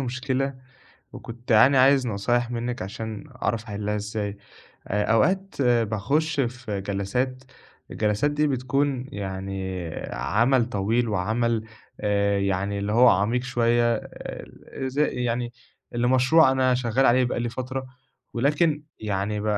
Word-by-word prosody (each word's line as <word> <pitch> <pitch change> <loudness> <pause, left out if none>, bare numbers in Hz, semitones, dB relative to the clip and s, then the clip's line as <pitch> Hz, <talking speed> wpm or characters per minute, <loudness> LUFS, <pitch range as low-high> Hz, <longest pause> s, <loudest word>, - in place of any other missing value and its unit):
مشكلة 130 +1 -2 0.6
وكنت 120 +1 -10
يعني 125 +5 +6
عايز 135 0 +5
نصايح 120 +3 0
منِّك 120 -2 -3
عشان 110 +4 -6 0.2
أعرف 115 -1 0
أَحلّها 105 -1 -3
إزاي. 105 -1 -4 0.5
آآ 105 +1 0
أوقات 190 - +1
باخُش 120 +6 +1
في 120 -5 -3
جلسات، 115 +7 -2 0.5
الجلسات 105 +7 +1
دي 150 +1 +1
بتكون 130 0 0
يعني 95 -3 -4 0.2
عمل 120 +3 +2
طويل 115 +3 0
وعمل 110 +3 0 0.4
آآ 100 -1 +1
يعني 100 +1 -1
اللي 100 +1 -2
هو 120 +3 +6
عميق 105 +6 +2
شوية 120 -2 +2
آآ 130 +4 -8
ز 130 +2 -7
يعني 125 -4 0 0.4
لمشروع 130 +5 +4
أنا 130 -1 +2
شغّال 125 +1 +1
عليه 125 +2 +4
بقى 120 - -2
لي 120 - -1
فترة 130 +2 -5 0.5
ولكن 150 +4 +1 0.2
يعني 105 0 -2
ب - - -5
120 Hz, 125 wpm, -25 LUFS, 105-130 Hz, 0.6 s, يعني